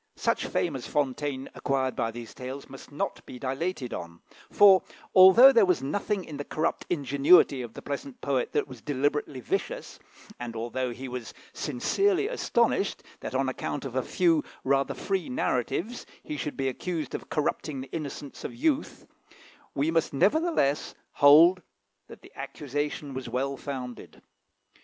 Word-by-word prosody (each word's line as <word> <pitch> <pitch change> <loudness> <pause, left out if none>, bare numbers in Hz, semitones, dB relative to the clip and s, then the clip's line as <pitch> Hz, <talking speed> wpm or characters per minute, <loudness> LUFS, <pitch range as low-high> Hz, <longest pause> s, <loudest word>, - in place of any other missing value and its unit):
Such - - 0
fame 165 -5 -1
as 125 - -6
Fontaine 140 -1 -1
acquired 135 -2 -1
by 115 - 0
these 115 0 -8
tales 130 +2 -7
must 135 +1 -12
not 145 - -3
be 125 - -8
dilated 135 +1 -3
on; 85 -1 -7 0.3
for, 195 -2 +7 0.3
although 190 +8 +9
there 230 -5 +5
was 180 -8 +2
nothing 195 +6 -2
in 150 - -8
the 145 - -4
corrupt 155 +3 -2
ingenuity 140 -1 +4
of 120 -2 -8
the - - -9
pleasant 140 -2 -5
poet 135 -3 -1
that - - +1
was 130 -4 -11
deliberately 145 -1 -1
vicious, - - -3 0.4
and 120 -1 -6
although 120 +3 -2
he 130 +3 -7
was 125 -2 -7 0.2
sincerely 390 - +1
astonished - - 0 0.2
that, - - -6
on - - +1
account - - -3
of - - -6
a - - +2
few 330 -4 +2 0.2
rather 140 0 +1
free 190 +4 -2
narratives, 135 - -2 0.2
he 150 - -5
should 150 0 -4
be 135 - 0
accused 160 +5 -3
of - - -6
corrupting 150 -2 -2
the 130 - -10
innocence 145 -3 -6
of - - -6
youth, 295 +3 -1 0.7
we 145 +4 +1
must 165 -3 +1
nevertheless 210 - +1 0.2
hold 165 +6 +7 0.5
that - - -13
the - - -15
accusation 145 0 -4
was 130 0 -5
well 135 +2 -1
founded. 130 -4 -7
140 Hz, 155 wpm, -27 LUFS, 130-175 Hz, 0.7 s, although